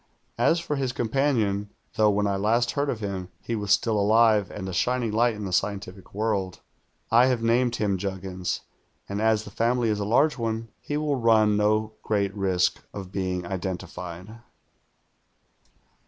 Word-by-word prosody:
As 150 +8 +3
for 150 -3 -3
his 130 -2 -1
companion, 115 -5 0 0.2
though 110 -1 +4
when 105 0 +1
I 100 -1 +1
last 115 +5 +1
heard 140 0 -1
of 115 - -3
liim 95 -3 -4
he 115 - -4
was 105 -2 -2
still 110 -3 +3
alive 110 -1 +4
and 95 -2 -6
a 95 - -5
shining 120 +4 0
light 115 +1 +2
in 105 -1 -5
the 95 - -4
scien 100 +3 +1
tific 95 -1 -12
world, 100 -4 -1 0.5
I 120 +3 +6
have 125 -3 0
named 120 +1 +2
him 100 -4 0
Juggins, 95 -1 -3 0.5
and 100 +1 -3
as 110 -1 +2
the 105 - -10
family 120 +2 +1
is 105 -1 0
a - - -1
large 135 +7 +2
one, 115 0 -2
he 145 - -3
will 150 -2 0
run 110 -3 +4
no 110 +1 +1
great 100 -2 0
risk 95 -3 0
of 95 -2 -7
being 90 -2 -2
identified. 90 +2 -6
105 Hz, 170 wpm, -26 LUFS, 100-115 Hz, 0.5 s, I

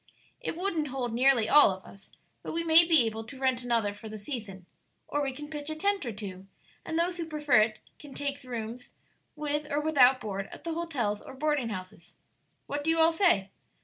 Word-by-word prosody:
It - - -4
wouldn't 340 -5 -1
hold 250 -3 -3
nearly 245 -2 +4
all 295 +1 +7
of 190 -1 -6
us, 195 - -14 0.3
but - - -6
we 335 +1 -1
may 330 +1 +8
be 315 -8 +6
able 225 0 -3
to 245 +5 -11
rent 260 -2 +1
another 230 -4 0
for 210 +2 -10
the 215 - -7
season, 205 -6 -6 0.4
or 290 - -1
we 275 -1 -1
can 295 +3 -8
pitch 295 0 -5
a 310 - -3
tent 395 -2 0
or - - -2
two, 195 -2 -8 0.4
and 320 - -3
those 345 +1 0
who 335 - -3
prefer 300 -6 +3
it 215 0 0 0.2
can 290 -3 -12
take 285 -1 -3
rooms, 240 -1 -7 0.4
with 300 0 -3
or 290 - +1
without 270 -4 +5
board, 195 -4 -5
at - - -11
the 335 - -3
hotels 275 -12 -2
or 265 - -11
boarding 290 -4 0
houses. 185 -4 -9 0.5
What 290 0 -4
do 320 - 0
you 325 - +3
all 325 0 +5
say?" 265 - +2
270 Hz, 215 wpm, -29 LUFS, 220-310 Hz, 0.5 s, may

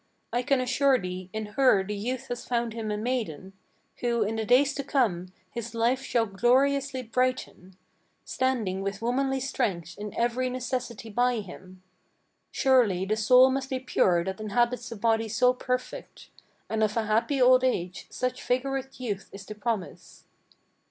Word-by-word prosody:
I 240 - +1
can 270 +1 +1
assure 255 +2 +3
thee, 185 -2 -6
in 220 +1 -4
her 255 -8 +5
the 210 - -4
youth 250 +6 -4
has 245 0 -4
found 235 -2 -1
him 225 -1 -4
a 210 - -1
maiden, 210 - -3 0.4
Who, 235 -2 0
in 215 +2 -2
the 220 - -2
days 275 +5 +4
to 280 - -4
come, 215 -11 0 0.2
his 235 0 -6
life 240 +3 +1
shall 235 -3 +1
gloriously 260 +6 +1
brighten, 250 -6 -2 0.5
Standing 225 -8 -1
with 200 +2 -4
womanly 265 +3 0
strength 200 - -2
in 210 0 -5
every 240 +2 0
necessity 250 -3 -4
by 245 +3 +2
him. 185 -1 -13 0.7
Surely 235 -9 +3
the 215 +2 0
soul 250 +4 +6
must 265 0 -2
be 260 - -2
pure 180 -9 +2
that 190 +2 -5
inhabits 240 +3 0
a - - -5
body 225 +1 +1
so 250 +4 +3
perfect, 250 0 -5 0.4
And 220 0 -2
of 215 +1 +1
a 225 - +2
happy 230 +6 +1
old 255 0 +6
age 180 -8 -1
such 255 0 -3
vigorous 270 +1 -2
youth 205 -6 -4
is 195 0 -10
the 215 - -7
promise." 215 -3 -5
235 Hz, 165 wpm, -27 LUFS, 210-255 Hz, 0.7 s, soul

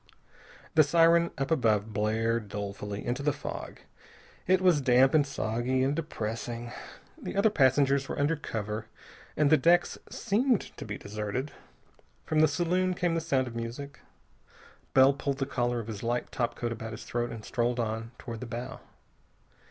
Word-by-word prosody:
The 160 - +7
siren 170 +2 +5
up 135 +2 -2
above 110 -7 +2
blared 110 +1 0
dolefully 100 0 -5
into 125 +3 -1
the 145 +1 +2
fog. 145 +1 -7 0.7
It 185 +1 +4
was 180 -5 +4
damp, 130 0 +5
and 150 -2 +4
soggy, 125 +1 -1
and 140 +2 +1
depressing. 120 -5 -4 0.5
The - - -5
other 200 +2 +4
passengers 135 -3 +3
were - - -3
under 145 +3 +2
cover, 110 -6 -4 0.5
and 150 -1 +3
the 155 - +7
decks 175 +5 +3
seemed 235 +2 0
to - - -7
be 105 - -5
deserted. 105 +7 -4 0.7
From 155 - +1
the 155 - +6
saloon 180 +4 0
came 175 -1 0
the 165 - 0
sound 135 -5 +1
of 120 -2 -8
music. 120 +5 -6 1.0
Bell 135 +1 +7
pulled 140 0 -2
the 135 - -1
collar 120 -3 -1
of 115 - -5
his 110 -2 -6
light 120 +1 -2
topcoat 120 -1 -2
about 115 0 -5
his 110 - -8
throat 120 0 -2
and 115 -2 -8
strolled 120 -2 0
on 115 0 -2
toward 115 -3 -7
the 125 - -6
bow. 120 +2 -6
130 Hz, 165 wpm, -29 LUFS, 115-150 Hz, 1.0 s, The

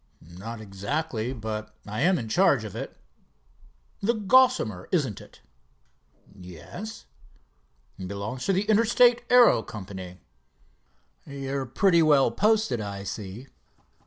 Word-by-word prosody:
"Not 110 +6 -7
exactly, 115 +5 -3
but 110 -3 -6
I 105 +4 -4
am 180 +3 +3
in 115 - -5
charge 110 - +3
of - - -8
it." - - -7 1.0
"The 235 +4 +1
Gossamer, 205 - +3
isn't 140 - -1
it?" - - -17 0.9
"Yes." 95 - -10 0.9
"Belongs 100 - -5
to 195 - +3
the 190 +2 +1
Interstate 230 +3 +4
Aero 245 - +6
Company?" 95 -4 -9 1.1
"You're 135 -1 -4
pretty 170 +6 +3
well 150 -4 +4
posted, 210 - +1
I 100 -1 -6
see." 100 +4 -7
125 Hz, 110 wpm, -26 LUFS, -, 1.1 s, Aero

